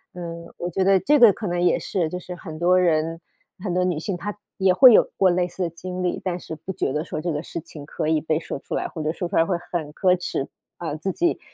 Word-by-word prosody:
嗯， 170 Hz, -1 st, -7 dB
我 175 Hz, -, -3 dB
觉 190 Hz, +2 st, +1 dB
得 195 Hz, 0 st, +5 dB
这 295 Hz, +7 st, +3 dB
个 235 Hz, -4 st, +9 dB
可 220 Hz, -, -7 dB
能 175 Hz, 0 st, -1 dB
也 180 Hz, -, +3 dB
是， 170 Hz, -5 st, -1 dB
就 180 Hz, -, -4 dB
是 180 Hz, 0 st, -8 dB
很 160 Hz, -2 st, -9 dB
多 180 Hz, +1 st, +4 dB
人、 165 Hz, -1 st, +1 dB, 0.4 s
很 185 Hz, -, -2 dB
多 180 Hz, -, +2 dB
女 180 Hz, -3 st, 0 dB
性， 180 Hz, +2 st, -3 dB
她 205 Hz, +3 st, -5 dB, 0.2 s
也 190 Hz, -1 st, +4 dB
会 255 Hz, +6 st, +9 dB
有 -, -, +5 dB
过 190 Hz, -, +5 dB
类 175 Hz, 0 st, +1 dB
似 180 Hz, +1 st, -4 dB
的 170 Hz, -, -1 dB
经 180 Hz, +2 st, -6 dB
历。 180 Hz, -, -1 dB
但 180 Hz, -2 st, -1 dB
是 160 Hz, -, -8 dB
不 165 Hz, +5 st, -7 dB
觉 135 Hz, -, -1 dB
得 150 Hz, +4 st, -2 dB
说 155 Hz, -, -4 dB
这 170 Hz, 0 st, -1 dB
个 150 Hz, -, -2 dB
事 170 Hz, -, -6 dB
情 150 Hz, -2 st, -11 dB
可 155 Hz, -, -3 dB
以 160 Hz, -, +3 dB
被 155 Hz, 0 st, 0 dB
说 140 Hz, -, -5 dB
出 -, -, -5 dB
来， -, -, -1 dB
或 160 Hz, -, -6 dB
者 155 Hz, -, 0 dB
说 175 Hz, 0 st, -3 dB
出 -, -, -1 dB
来 165 Hz, -, +5 dB
会 180 Hz, 0 st, 0 dB
很 155 Hz, -4 st, -3 dB
可 185 Hz, +1 st, +3 dB
耻。 155 Hz, -5 st, -3 dB, 0.3 s
呃， 165 Hz, -4 st, -3 dB
自 190 Hz, +4 st, -2 dB
己， 345 Hz, -, 0 dB
175 Hz, 295 characters per minute, -23 LUFS, 160-185 Hz, 0.4 s, 个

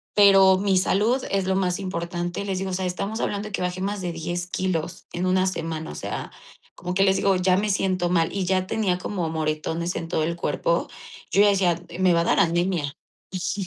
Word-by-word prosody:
"Pero 195 Hz, -2 st, +7 dB
mi 195 Hz, -1 st, +2 dB
salud 215 Hz, +8 st, +2 dB
es 195 Hz, -1 st, +1 dB
lo 190 Hz, 0 st, +1 dB
más 180 Hz, -2 st, 0 dB
importante", 175 Hz, 0 st, -3 dB
les 190 Hz, -2 st, -2 dB
digo: 190 Hz, -1 st, -3 dB
"O -, -, -3 dB
sea, 185 Hz, 0 st, -2 dB
estamos 200 Hz, +5 st, -3 dB
hablando 205 Hz, +1 st, -2 dB
de -, -, -14 dB
que -, -, -2 dB
baje 180 Hz, +1 st, -2 dB
más 200 Hz, +1 st, -2 dB
de 175 Hz, -2 st, -2 dB
10 175 Hz, +2 st, -4 dB
kilos 180 Hz, -2 st, -3 dB
en 175 Hz, +1 st, -2 dB
una 185 Hz, 0 st, +3 dB
semana", 160 Hz, -, -4 dB
o -, -, -9 dB
sea, -, -, -5 dB, 0.4 s
como 180 Hz, 0 st, -5 dB
que 195 Hz, -, +4 dB
les 190 Hz, -1 st, +3 dB
digo: 195 Hz, -1 st, +2 dB
"Ya 180 Hz, 0 st, +3 dB
me 210 Hz, +1 st, 0 dB
siento 185 Hz, -3 st, 0 dB
mal". 165 Hz, -2 st, +1 dB
Y 195 Hz, -2 st, -1 dB
ya 185 Hz, 0 st, +1 dB
tenía 200 Hz, -5 st, 0 dB
como 180 Hz, -3 st, -3 dB
moretones 160 Hz, +2 st, -2 dB
en 165 Hz, -, -4 dB
todo 160 Hz, -, 0 dB
el 170 Hz, +1 st, -1 dB
cuerpo. -, -, 0 dB, 0.4 s
Yo 205 Hz, +1 st, +5 dB
decía: 180 Hz, -4 st, +2 dB, 0.2 s
"Me 185 Hz, -1 st, +4 dB
va 170 Hz, -, +3 dB
a -, -, -1 dB
dar -, -, +2 dB
anemia". 170 Hz, -4 st, +1 dB, 0.4 s
Ujú. 185 Hz, +1 st, -2 dB
185 Hz, 220 wpm, -24 LUFS, 175-195 Hz, 0.4 s, Pero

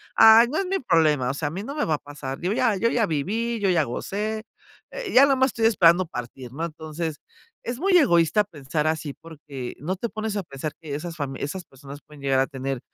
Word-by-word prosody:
"Ay, 225 Hz, +2 st, +8 dB
no 300 Hz, -, -2 dB
es 390 Hz, -, -1 dB
mi 385 Hz, +1 st, 0 dB
problema", 155 Hz, -, +2 dB
o -, -, -5 dB
sea, 145 Hz, +1 st, -2 dB
a -, -, -9 dB
mí 190 Hz, +5 st, -5 dB
no 275 Hz, +6 st, -6 dB
me 300 Hz, -, 0 dB
va 155 Hz, -, +1 dB
a -, -, -4 dB
pasar, 140 Hz, -2 st, -7 dB
digo 180 Hz, +4 st, -1 dB
ya, 230 Hz, -2 st, +2 dB
yo 230 Hz, +4 st, +2 dB
ya 235 Hz, -2 st, +2 dB
viví, 220 Hz, +10 st, -1 dB
yo 195 Hz, -, +2 dB
ya 170 Hz, -4 st, +3 dB
gocé, 210 Hz, -, -3 dB, 0.5 s
eh, -, -, -5 dB
ya 270 Hz, -, +8 dB
nomás 265 Hz, -2 st, +3 dB
estoy 225 Hz, -3 st, -1 dB
esperando 180 Hz, -4 st, +4 dB
partir, 125 Hz, -3 st, -8 dB
¿no? 160 Hz, +4 st, -4 dB
Entonces, 160 Hz, -1 st, -5 dB, 0.5 s
es 240 Hz, +1 st, -4 dB
muy 375 Hz, +3 st, +2 dB
egoísta 210 Hz, -, +4 dB
pensar 150 Hz, -3 st, -3 dB
así 155 Hz, -2 st, -2 dB
porque 145 Hz, -6 st, -8 dB
no 170 Hz, +8 st, -2 dB
te 230 Hz, +5 st, -4 dB
pones 215 Hz, -1 st, -4 dB
a -, -, 0 dB
pensar 150 Hz, -1 st, -6 dB
que 150 Hz, -3 st, -5 dB
esas 165 Hz, +3 st, -6 dB
fami 135 Hz, -3 st, -4 dB
esas 180 Hz, +6 st, -4 dB
personas 140 Hz, +1 st, -12 dB
pueden 150 Hz, 0 st, -15 dB
llegar 135 Hz, -1 st, +2 dB
a 135 Hz, -, +2 dB
tener 135 Hz, -2 st, -4 dB
165 Hz, 230 wpm, -24 LUFS, 145-220 Hz, 0.5 s, Ay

